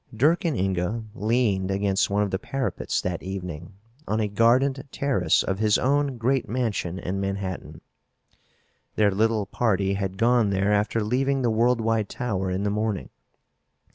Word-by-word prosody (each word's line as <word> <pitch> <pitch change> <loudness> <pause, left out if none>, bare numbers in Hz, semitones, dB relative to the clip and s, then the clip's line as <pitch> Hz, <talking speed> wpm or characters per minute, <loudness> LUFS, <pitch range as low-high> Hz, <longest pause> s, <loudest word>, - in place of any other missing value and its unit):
Dirk 155 - +2
and 155 -7 0
Inga 95 +4 -1
leaned 105 -4 +1
against 100 0 +1
one 100 +1 +2
of 100 - -3
the 95 - -1
parapets 135 +4 -2
that 90 -2 -3
evening 90 -2 -6 0.3
on 110 - 0
a 105 - +1
gardened 125 +6 +2
terrace 115 - +1
of 95 0 -2
his 105 -1 +3
own 140 0 +1
great 125 0 0
mansion 110 -7 -2
in 95 +2 -3
Manhattan. 95 -1 -4 1.1
Their 105 -1 +3
little 110 +1 +1
party 100 -2 0
had 95 -1 -3
gone 115 -1 +3
there 100 +1 +1
after 105 +2 +1
leaving 135 +4 0
the 120 - +2
Worldwide 115 -2 +1
Tower 100 -6 -2
in 95 +2 -1
the 105 - 0
morning. 105 -2 -2
105 Hz, 155 wpm, -25 LUFS, 95-120 Hz, 1.1 s, his